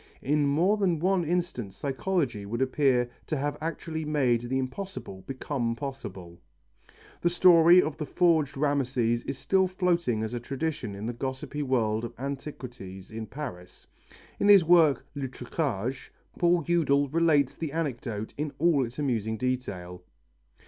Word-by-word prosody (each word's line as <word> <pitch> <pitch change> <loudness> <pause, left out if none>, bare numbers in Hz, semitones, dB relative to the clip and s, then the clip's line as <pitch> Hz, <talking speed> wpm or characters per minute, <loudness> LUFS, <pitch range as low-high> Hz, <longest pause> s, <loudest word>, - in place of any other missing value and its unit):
In 145 +1 +2
more 175 +9 +3
than 185 -5 +1
one 185 +2 +1
instance 160 - -2
psychology 140 - -1
would 110 +4 -4
appear 130 -2 +2 0.2
to 155 - -1
have 145 +2 -1
actually 160 0 -4
made 135 -6 +1
the 125 +2 -2
impossible 130 - -5
become 130 -3 -2
possible. 95 -11 -7 0.8
The 175 - +3
story 175 0 +7
of 155 - -4
the 150 -2 -4
forged 155 -4 +2
Rameses 130 -5 +1
is 135 - -4
still 190 +7 +2
floating 175 - 0
as 110 +2 -4
a 120 - -2
tradition 135 -4 -3
in 100 +2 -6
the 120 - -2
gossipy 130 +4 -4
world 115 -5 0
of 120 0 -6
antiquities 125 -8 -7
in 110 0 -6
Paris. 100 -8 -8 0.5
In 200 - +2
his 200 -4 +8
work, 165 -4 +5
Le 140 -1 -3
Truquage, 125 - -3 0.3
Paul 175 -1 +3
Eudel 145 -5 +2
relates 150 -3 +2
the 160 -3 -4
anecdote 120 -9 -3
in 150 -1 -2
all 160 -4 +3
its 120 +1 -7
amusing 115 -6 -1
detail. 100 -9 -3
140 Hz, 150 wpm, -28 LUFS, 120-160 Hz, 0.8 s, his